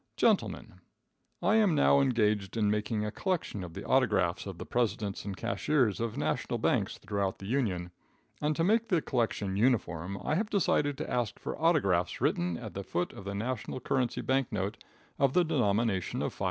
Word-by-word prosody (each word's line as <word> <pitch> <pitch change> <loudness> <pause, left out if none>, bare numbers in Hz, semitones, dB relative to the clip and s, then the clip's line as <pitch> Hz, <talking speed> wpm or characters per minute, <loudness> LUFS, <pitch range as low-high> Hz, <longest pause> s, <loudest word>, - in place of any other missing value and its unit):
Gentlemen 90 - +1 0.6
I 205 +5 +4
am 205 -7 +4
now 140 -1 +5
engaged 110 -6 +1
in 105 -2 +2
making 105 0 -1
a 105 - -3
collection 170 - -2
of 85 -1 -9
the 100 - -6
autographs 100 -9 +2
of 95 -3 -6
the - - -7
presidents 110 -5 -1
and 100 -2 -5
cashiers 110 - +1
of 115 -1 -2
national - - -1
banks - - 0
throughout 100 -2 -2
the 95 - -10
Union, 95 -8 -1 0.5
and 150 +1 +1
to 165 - +1
make 220 +5 +3
the 180 -6 +3
collection 110 -6 -1
uniform, 100 -6 +1
I - - 0
have 210 +6 0
decided 145 -7 +1
to - - -4
ask 120 -4 -1
for - - -5
autographs 120 - +2
written 85 -1 0
at - - -8
the 100 - -5
foot 90 -2 -2
of 100 - -10
the 100 0 -4
national 125 +4 -3
currency 125 -1 0
bank 135 -1 0
note 100 -1 -3 0.4
of 135 -1 +3
the 180 - +5
denomination 110 - 0
of - - -2
$5. - - -18
110 Hz, 185 wpm, -30 LUFS, 100-140 Hz, 0.6 s, now